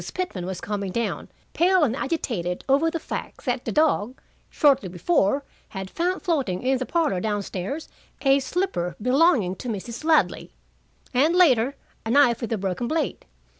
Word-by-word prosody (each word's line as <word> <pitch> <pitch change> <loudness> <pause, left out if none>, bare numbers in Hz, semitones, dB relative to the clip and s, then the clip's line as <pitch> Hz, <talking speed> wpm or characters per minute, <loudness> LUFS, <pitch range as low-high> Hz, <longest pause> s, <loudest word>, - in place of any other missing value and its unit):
Pitman 205 - -3
was 190 -2 -5
coming 200 -2 -3
down, 235 +3 -3 0.2
pale 365 0 +4
and 250 -4 +1
agitated 230 - -3
over 285 +4 +3
the 330 - -3
fact - - -6
that 250 -1 -1
the - - -2
dog, 270 -6 +1 0.3
shortly 275 - +3
before, 205 - +1 0.3
had 190 -1 -6
found 360 +2 -1
floating 275 - -1
in 260 0 +1
the 255 - -3
parlor 320 - +1
down 205 +1 -1
stairs 200 - -5 0.4
a 275 0 +5
slipper 270 - -2
belonging 250 - +3
to 250 - -7
Mrs. 230 +5 -5
Ladley, 320 0 +2 0.6
and, 295 +7 +3
later, 275 -7 +4 0.3
a 225 - -5
knife 250 -2 +4
with 235 - -4
a 225 - +1
broken 195 +4 -2
blade. 310 0 -2
255 Hz, 165 wpm, -24 LUFS, 200-315 Hz, 0.6 s, a